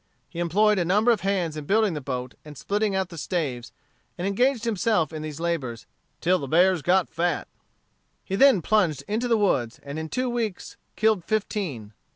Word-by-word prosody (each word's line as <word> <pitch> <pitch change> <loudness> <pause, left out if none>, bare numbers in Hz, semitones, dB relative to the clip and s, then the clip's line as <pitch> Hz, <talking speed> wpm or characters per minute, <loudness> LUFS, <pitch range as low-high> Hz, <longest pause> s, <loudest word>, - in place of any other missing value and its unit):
He 170 - -8
employed 205 +4 +3
a - - +2
number 210 +7 +3
of 225 - +1
hands 185 -5 -1
in 150 -1 -6
building 210 +1 +2
the 150 - -4
boat 125 -2 -4
and 150 -2 -11
splitting 205 0 -1
out 190 -2 -1
the 170 -3 -8
staves, 140 -9 -3 0.5
and 180 - -3
engaged 240 +5 +1
himself 210 -6 +1
in 155 - -5
these 155 -1 -6
labors 145 -10 -3 0.4
"till 180 +2 +2
the 140 - -5
bears 180 +3 +3
got 180 +4 +2
fat." 170 -1 -1 0.8
He 190 - -2
then 240 - +5
plunged 175 -10 +1
into 225 +4 -1
the 230 -2 +3
woods, 130 - 0
and 140 +2 -6
in 160 0 -5
two 255 +7 -1
weeks 230 -6 -3 0.2
killed 215 -4 +2
fifteen. 180 - -3
180 Hz, 190 wpm, -25 LUFS, 155-210 Hz, 0.8 s, then